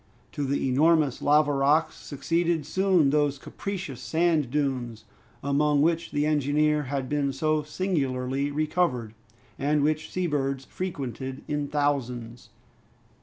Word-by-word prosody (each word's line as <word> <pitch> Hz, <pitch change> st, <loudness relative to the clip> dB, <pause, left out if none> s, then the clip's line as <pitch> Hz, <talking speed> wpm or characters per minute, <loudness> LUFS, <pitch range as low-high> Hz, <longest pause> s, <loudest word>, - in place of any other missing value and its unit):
To 145 Hz, -, -3 dB
the 135 Hz, 0 st, 0 dB
enormous 150 Hz, +1 st, +3 dB
lava 145 Hz, 0 st, +4 dB
rocks 145 Hz, +4 st, +2 dB
succeeded 165 Hz, +2 st, -1 dB
soon 185 Hz, -4 st, +3 dB
those 145 Hz, -1 st, +2 dB
capricious 175 Hz, -4 st, -6 dB
sand 160 Hz, -3 st, +1 dB
dunes, 130 Hz, -5 st, -2 dB, 0.4 s
among 145 Hz, +1 st, +2 dB
which 165 Hz, +1 st, +1 dB
the 145 Hz, 0 st, 0 dB
engineer 150 Hz, 0 st, +2 dB
had 135 Hz, 0 st, -3 dB
been 145 Hz, -1 st, 0 dB
so 155 Hz, +3 st, 0 dB
singularly 140 Hz, -5 st, -1 dB
recovered, 145 Hz, -6 st, 0 dB, 0.5 s
and 145 Hz, +1 st, +1 dB
which 155 Hz, +1 st, 0 dB
seabirds 140 Hz, -6 st, -1 dB
frequented 135 Hz, -, -5 dB
in 145 Hz, -1 st, -2 dB
thousands. 125 Hz, -5 st, -2 dB
145 Hz, 120 wpm, -26 LUFS, 135-155 Hz, 0.5 s, lava